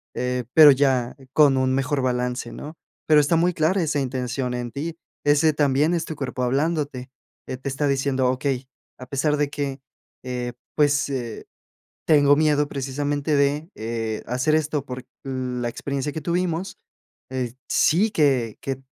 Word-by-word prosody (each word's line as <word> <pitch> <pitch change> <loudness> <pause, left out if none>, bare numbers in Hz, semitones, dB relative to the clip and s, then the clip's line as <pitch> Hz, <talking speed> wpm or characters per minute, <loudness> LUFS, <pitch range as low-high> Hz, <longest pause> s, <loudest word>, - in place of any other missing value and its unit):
eh, 125 0 -2
pero 155 -2 +10
ya 130 -3 +1 0.2
con 145 -3 +5
un 130 0 +2
mejor 135 +1 0
balance, 125 -1 -1
¿no? 155 +3 -9 0.3
Pero 155 -1 +6
está 145 +3 +2
muy 175 +2 +2
clara 170 +5 +1
esa 145 -2 0
intención 125 -1 -2
en 120 -1 -4
ti. 160 +6 -5 0.3
Ese 150 +2 +4
también 145 +2 +2
es 165 -2 -1
tu 160 - -6
cuerpo 130 -3 -4
hablándote. 140 0 -1 0.4
Eh, 130 - -4
te 130 - -8
está 140 +2 -1
diciendo: 135 -2 +1
"Okey, 130 0 -2 0.3
a 125 - -8
pesar 145 +3 +1
de 145 -1 0
que, 140 -2 -4 0.4
eh, 125 -1 -4 0.2
pues, 145 -1 +2
eh, 125 -5 -4 0.6
tengo 145 -2 +5
miedo 150 -1 +2
precisamente 145 +2 -1
de, 145 +3 +1
eh, 110 -1 -3
hacer 130 +6 +1
esto 150 -2 -1
por 125 -1 -7 0.2
la 125 -2 -3
experiencia 140 +4 -3
que 160 - -4
tuvimos, 175 +2 -2 0.5
eh, 125 -3 -3 0.2
sí 195 +8 +3
que 130 - +1
que 135 -1 -4
140 Hz, 160 wpm, -23 LUFS, 125-150 Hz, 0.6 s, pero